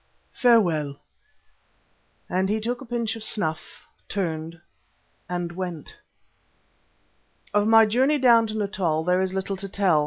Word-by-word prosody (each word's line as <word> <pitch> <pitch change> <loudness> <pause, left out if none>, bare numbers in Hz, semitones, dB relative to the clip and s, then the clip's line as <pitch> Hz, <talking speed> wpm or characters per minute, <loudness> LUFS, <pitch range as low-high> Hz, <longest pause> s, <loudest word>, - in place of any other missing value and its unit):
Farewell!" 170 - +2 1.3
and 190 +1 0
he 215 +1 0
took 240 +3 -3
a 270 - -10
pinch 230 -2 -2
of 225 - -8
snuff, 160 -7 -3 0.2
turned, 165 -3 -3 0.7
and 175 -1 -3
went. 175 -3 -6 1.6
Of 205 0 +2
my 225 0 +7
journey 260 +7 +2
down 235 -4 +5
to 215 0 -5
Natal 185 -6 -1
there 180 +2 +2
is 190 0 -2
little 195 0 -3
to 195 +1 -5
tell. 185 -5 +2
195 Hz, 130 wpm, -24 LUFS, 175-225 Hz, 1.6 s, my